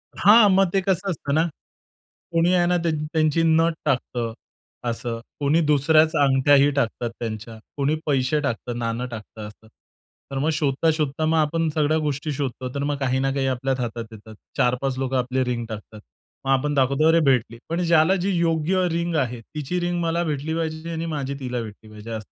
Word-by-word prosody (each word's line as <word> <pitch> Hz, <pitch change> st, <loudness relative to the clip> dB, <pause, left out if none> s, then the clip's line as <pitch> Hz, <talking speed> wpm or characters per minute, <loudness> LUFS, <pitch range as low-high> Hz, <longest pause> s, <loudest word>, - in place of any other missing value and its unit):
हां. 210 Hz, +2 st, +7 dB
मग 190 Hz, -1 st, +4 dB
ते 195 Hz, -, +3 dB
कसं 190 Hz, +1 st, 0 dB
असतं 145 Hz, -4 st, -3 dB
ना. 160 Hz, +2 st, +3 dB, 0.9 s
कोणी 170 Hz, +2 st, +3 dB
आहे 175 Hz, -1 st, +3 dB
ना 180 Hz, 0 st, +2 dB
त्यांची, 155 Hz, -2 st, -1 dB
त्यांची 155 Hz, 0 st, +2 dB
नथ 165 Hz, +1 st, +3 dB
टाकतं 125 Hz, -4 st, -1 dB, 0.6 s
असं. 115 Hz, 0 st, -4 dB, 0.2 s
कोणी 150 Hz, +4 st, +2 dB
दुसऱ्याच 155 Hz, +2 st, +4 dB
अंगठ्याही 140 Hz, +1 st, +4 dB
टाकतात, 120 Hz, -3 st, -1 dB
त्यांच्या 110 Hz, -1 st, -5 dB, 0.2 s
कोणी 140 Hz, +2 st, +1 dB
पैसे 140 Hz, +1 st, +1 dB
टाकतं, 120 Hz, -3 st, -3 dB
नाणं 115 Hz, +1 st, -2 dB
टाकतं 110 Hz, -1 st, -8 dB
असं. 110 Hz, +1 st, -16 dB, 0.6 s
तर 135 Hz, -, -3 dB
मग 155 Hz, +3 st, +1 dB
शोधता-शोधता 150 Hz, 0 st, 0 dB
मग 160 Hz, +1 st, +2 dB
आपण 160 Hz, +2 st, +1 dB
सगळ्या 155 Hz, 0 st, +2 dB
गोष्टी 150 Hz, 0 st, -2 dB
शोधतो. 130 Hz, -2 st, -4 dB
तर 140 Hz, -, -1 dB
मग 145 Hz, 0 st, -1 dB
काही 130 Hz, -1 st, 0 dB
ना, 135 Hz, 0 st, +1 dB
काही 135 Hz, -1 st, 0 dB
आपल्याच 130 Hz, 0 st, -1 dB
हातात 115 Hz, -2 st, -3 dB
येतात. 110 Hz, 0 st, -12 dB, 0.2 s
4-5 125 Hz, +2 st, +1 dB
लोकं 130 Hz, 0 st, -1 dB
आपली 130 Hz, +1 st, 0 dB
रिंग 120 Hz, -2 st, -2 dB
टाकतात. 110 Hz, 0 st, -8 dB, 0.5 s
मग 135 Hz, -, +1 dB
आपण 140 Hz, +2 st, +1 dB
दाखवतो, 140 Hz, +2 st, +2 dB
"अरे 165 Hz, +1 st, +5 dB
भेटली." 125 Hz, -4 st, +2 dB
पण 170 Hz, +2 st, -1 dB
ज्याला 165 Hz, +2 st, +4 dB
जी 195 Hz, -, 0 dB
योग्य 170 Hz, +2 st, +1 dB
रिंग 170 Hz, 0 st, -1 dB
आहे 120 Hz, -2 st, -3 dB
तिची 150 Hz, +8 st, -4 dB
रिंग 175 Hz, 0 st, -1 dB
मला 170 Hz, +1 st, 0 dB
भेटली 155 Hz, 0 st, -2 dB
पाहिजे 160 Hz, 0 st, -3 dB
आणि 165 Hz, 0 st, -3 dB
माझी 140 Hz, -2 st, -3 dB
तिला 125 Hz, -2 st, -3 dB
भेटली 110 Hz, 0 st, -10 dB
पाहिजे. 110 Hz, +1 st, -7 dB
145 Hz, 180 wpm, -23 LUFS, 125-160 Hz, 0.9 s, हां